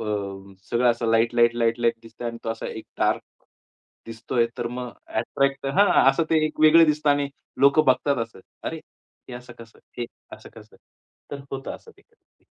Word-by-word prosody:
अ, - - -4 0.7
सगळं 120 +1 +3
असं 120 0 -2
light light, 120 +1 +3
light light 115 0 +1
दिसतंय 115 +1 -7
आणि 115 0 -7
तो 115 - -2
असा 115 - -5
एक 110 - -8
डार्क - - +1 0.8
दिसतोय. 115 +1 -1
तर 120 - -2
मग 125 0 -6 0.2
अट्रॅक्ट 135 +4 -1
तर 135 - 0
हां, 205 -1 +6 0.2
असं 160 +4 0
ते 155 -1 +3
एक 155 - -7
वेगळं 160 +2 +7
दिसतं 150 -1 +2
आणि 145 0 +1 0.3
लोक 140 +2 +5
बघतात 130 +2 +3
असं, 115 -4 -17 0.2
"अरे! - - -3 0.5
हे 125 - -7
असं 125 0 -10
कसं? 115 0 -14 0.2
हे 120 - -1 0.3
असं - - -14
कसं?" - - -15 0.5
तर 140 - -6
होतं 135 0 -5
असं 460 - -17
ते - - -23
कधी-कधी. 460 -1 -40
125 Hz, 180 wpm, -24 LUFS, 115-140 Hz, 0.8 s, वेगळं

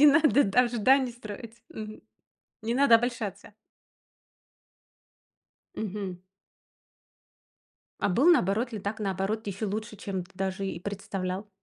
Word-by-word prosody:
не 295 - +9
надо, 285 -3 +6
да, 195 +5 +4
ожиданий 250 +2 +3
строить, 230 0 -9
мгм? 215 0 -8 0.6
Не 230 +2 -1
надо 275 -3 +6
обольщаться. 225 -4 -4 2.2
Мгм. 195 -3 -4 1.8
А - - +2
был 235 - +3
наоборот 230 - +2
ли, 215 - -3
так 205 +2 -4
наоборот, 200 +2 -1
еще 200 +2 -3
лучше, 215 +2 -4
чем 195 -2 -4
ты 180 - -23
даже 190 +1 -2
и 190 - -4
представлял? 195 0 -4
215 Hz, 120 wpm, -28 LUFS, 195-235 Hz, 2.2 s, не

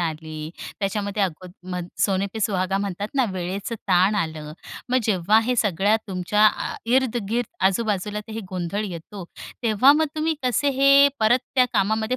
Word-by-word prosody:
आले. 155 -2 -4 0.3
त्याच्यामध्ये 200 +1 -1
अ, 180 0 -5 0.2
सोने 195 0 +1
पे 220 - -5
सुहागा 195 -1 0
म्हणतात 200 0 -3
ना, 265 - +3
वेळेचं 190 +5 -4
ताण 185 +3 +4
आलं. 160 -5 -3 0.4
मग 255 - +4
जेव्हा 210 +1 +3
हे 250 +1 0
सगळ्या 205 0 +2
तुमच्या 195 +3 +2
अ, 215 - -1
इर्द 255 0 +2
गिर्द 235 0 -2
आजूबाजूला 210 0 -1
तर - - -7
हे 225 - -4
गोंधळ 185 +3 -3
येतो 185 +1 -8 0.4
तेव्हा 230 +5 +5
मग 315 +1 +2
तुम्ही 315 +1 0
कसे 255 +3 +1
हे 275 +1 +7
परत 220 +3 +4 0.2
त्या 255 -1 +4
कामामध्ये 220 +4 +1
205 Hz, 160 wpm, -23 LUFS, 185-225 Hz, 0.4 s, हे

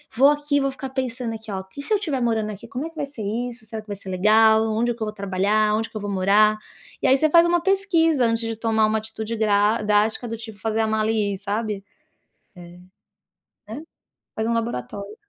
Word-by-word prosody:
"Vou 270 +4 +6
aqui, 290 -1 +1
vou 275 0 0
ficar 270 0 -7
pensando 250 -3 -3
aqui, 220 -1 -9
ó, 190 -1 -3
e 280 - -5
se 355 - -1
eu 415 - +3
tiver 290 - -2
morando 220 -2 0
aqui, 205 - -10
como 265 +5 -4
é - - -5
que 330 - -22
vai 295 - -2
ser 275 -6 -9
isso, 235 +2 -4
será 220 0 -6
que 215 - -25
vai 205 -1 -5
ser 195 - -14
legal, 220 +3 +4
onde 235 +2 0
que 235 - -20
eu - - 0
vou 210 - -4
trabalhar, 205 +2 +1
onde 225 +1 -2
que 215 - -7
eu - - -5
vou 205 0 -4
morar?", 205 +3 +3 0.4
e - - +2
aí 265 - +5
você 310 +3 +2
faz 335 +2 +6
uma 345 0 +2
pesquisa 335 -7 +2
antes 230 0 0
de 225 - -3
tomar 220 -1 +1
uma 215 0 +1
atitude 220 +1 -6
dra 210 0 +2
drástica 210 +3 +1
do 230 0 -5
tipo 220 -2 -10
fazer 220 +2 -1
a 220 - +1
mala 220 0 +1
e 205 -2 0
ir, - - -5
sabe, 205 0 -3 0.7
é, 175 0 -12 0.9
né, 250 +8 -7 0.5
faz 220 +1 -1
um 235 - +1
laboratório. 205 - -4
220 Hz, 235 wpm, -23 LUFS, 210-255 Hz, 0.9 s, Vou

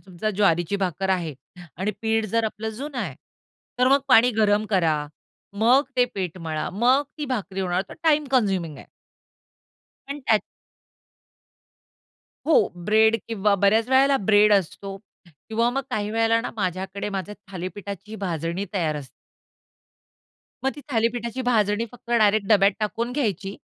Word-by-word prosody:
समजा 195 +3 -3
ज्वारीची 190 -2 +1
भाकर 190 +2 -2
आहे 170 -5 -1 0.4
आणि 190 +4 -1
पीठ 225 0 +1
जर 230 -1 +2
आपलं 220 0 -4
जुनं 265 +4 -6
आहे, - - -3 0.6
तर 250 - +4
मग 275 +1 +4
पाणी 250 0 +6
गरम 210 -1 +2
करा, 165 -6 +2 0.7
मग 255 +4 +6
ते 250 - +5
पीठ 185 -2 -4
मळा, 160 -2 -3
मग 245 +7 +3 0.2
ती 300 - -2
भाकरी 195 -5 -3
होणार. 180 0 0
तर - - -10
टाईम 305 -2 +3
कन्झ्युमिंग 190 - +1
आहे. - - -13 1.2
पण 280 - -4
त्यात 215 -2 +4 2.1
हो, 315 - +4 0.3
ब्रेड 220 +3 +4
किंवा 210 -2 +1
बऱ्याच 210 +4 +3
वेळेला 270 +1 +4
ब्रेड 210 0 +6
असतो 195 0 -1 0.5
किंवा 230 +2 +1
मग 270 +2 -2
काही 210 0 -2
वेळेला 225 +1 +2
ना - - -5
माझ्याकडे 190 +1 -3
माझ्या 200 +1 -4 0.2
थालीपीठाची 195 +3 -7
भाजणी 170 -1 -3
तयार 160 -5 0
असते. 140 -3 -8 1.6
मग 270 - +2
ती 295 - -10
थालीपीठाची 235 +1 -1
भाजणी 220 -3 +1
फक्त 240 -1 -14
डायरेक्ट 215 -3 +3
डब्यात 200 -2 +5
टाकून 230 +3 -2
घ्यायची 205 - -2
210 Hz, 140 wpm, -24 LUFS, 190-230 Hz, 2.1 s, पाणी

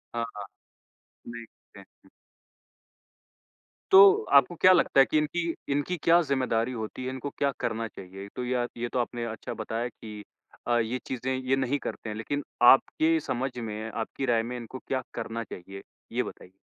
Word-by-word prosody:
हाँ, 115 - 0
हाँ। 105 -1 -6 0.8
देखते 120 -1 -12
हैं। - - -20 1.8
तो 190 - +10 0.4
आपको 140 +6 -4
क्या 185 +3 +6
लगता 170 -5 +3
है 135 - +8
कि 155 - 0
इनकी 165 +2 0 0.2
इनकी 145 +6 -1
क्या 170 +1 +6
ज़िम्मेदारी 130 -5 0
होती 110 +1 -5
है? - - -2
इनको 130 +2 -5
क्या 140 -1 +1
करना 115 +1 -2
चाहिए? 95 -1 -10
तो 125 - -3
या 125 -1 0
ये 120 0 -2
तो 125 - +1
आपने 120 0 -2
अच्छा 110 -2 -6
बताया 115 +2 -2
कि 105 -3 -10 0.5
अ, 120 0 +3
ये 115 +2 -1
चीज़ें 130 +1 -2
ये 130 +1 0
नहीं 135 +1 0
करते 115 - -6
हैं, 105 - -4
लेकिन 145 +6 -3 0.2
आपके 160 +6 +5
समझ 130 -2 -2
में, 110 -1 -5
आपकी 115 +5 -4
राय 115 -3 +2
में 120 +2 -5
इनको 120 +2 -8
क्या 130 -1 -1
करना 115 0 -4
चाहिए? 95 -1 -10 0.3
ये - - 0
बताइए। 90 - -10
120 Hz, 175 wpm, -27 LUFS, 115-135 Hz, 1.8 s, तो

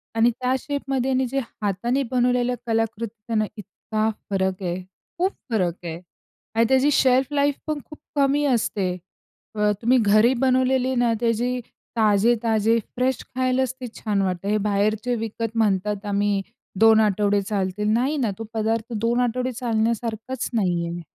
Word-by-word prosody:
आणि 230 +1 +4
त्या 255 0 +1
शेपमध्ये 270 -2 -2
आणि 260 0 +2
जे 270 +3 -1 0.2
हाताने 235 +7 0
बनवलेल्या 250 0 +2
कलाकृती 225 0 -1
त्यांना 220 -2 +1
इतका 215 +1 -3 0.2
फरक 190 -1 -1
आहे. 180 +1 -2 0.4
खूप 375 +3 +1 0.2
फरक 185 -7 0
आहे 165 0 -5 0.6
आणि 230 +1 +4
त्याची 265 +2 +4
शेल्फ 265 0 +3
लाईफ 285 0 +2
पण 305 -1 -1
खूप 300 - -13 0.2
कमी 285 +1 +2
असते. 220 -7 +1 0.7
अ, 210 0 +2
तुम्ही 250 +3 +4
घरी 215 +4 +5
बनवलेली 260 0 +2
ना 240 -1 +2
त्याची 240 +2 0 0.4
ताजे-ताजे 220 +1 +3 0.2
फ्रेश 255 +1 0
खायलाचं 255 0 +1
ते 250 - -4
छान 205 -3 0
वाटते. 185 0 -2
हे 210 - +2
बाहेरचे 215 +4 +1
विकत 225 0 -4
म्हणतात 205 -1 +1
आम्ही 205 0 +1 0.4
2 225 0 +7
आठवडे 205 -1 +2
चालतील 200 0 -2
नाही 265 +6 +1
ना 235 -7 0
तो 225 - -3
पदार्थ 225 +1 -1
2 230 +2 +1
आठवडे 250 +1 0
चालण्यासारखाचं 230 0 -2
नाही 175 -5 +1
आहे. 170 0 -5
225 Hz, 150 wpm, -23 LUFS, 210-255 Hz, 0.7 s, 2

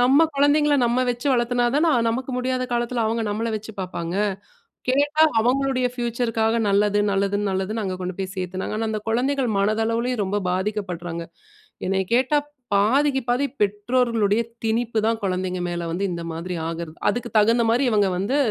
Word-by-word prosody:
நம்ம 275 +6 +5
குழந்தைகள 290 +1 +3
நம்ம 245 +2 +1
வச்சு 240 +3 -4
வளத்துனாதானே 245 +6 +2 0.2
நமக்கு 255 +3 -3
முடியாத 255 0 -1
காலத்துல 240 0 0
அவங்க 225 +1 -1
நம்மள 220 +3 -2
வச்சு 220 +1 -8
பாப்பாங்க. 175 -2 -4 0.7
கேட்டா 290 +4 +3 0.2
அவங்களுடைய 255 +2 +1
பியூச்சர்க்காக 235 -2 0
நல்லது, 205 +1 +3
நல்லதுன்னு, 200 +1 0
நல்லதுன்னு 190 +4 -2
அங்க 185 -1 -2
கொண்டு 180 0 -4
போய் 190 0 -4
சேர்த்தாங்க. 185 +2 -3
ஆனா 225 0 -1
அந்த 215 -1 -2
குழந்தைகள் 255 +2 +1
மனதளவிலேயும் 225 +3 0
ரொம்ப 200 +2 -1
பாதிக்கப்படுறாங்க. 180 -3 -3 0.6
என்னைய 190 0 +1
கேட்டா 260 +4 +3 0.4
பாதிக்கு 265 +7 +3
பாதி 250 +4 +2
பெற்றோர்களுடைய 210 +1 +1 0.2
திணிப்புதான், 225 0 0
குழந்தைங்கக 185 -1 -1
மேல 175 0 -3
வந்து 185 +4 -2
இந்த 170 -1 -4
மாதிரி 170 +3 -5
ஆகுறது. 165 -1 -6
அதுக்கு 240 0 -4
தகுந்த 230 +3 +4
மாரி 240 +4 +2
இவங்க 205 -3 +3
வந்து 200 +9 0
225 Hz, 145 wpm, -23 LUFS, 195-250 Hz, 0.7 s, நம்ம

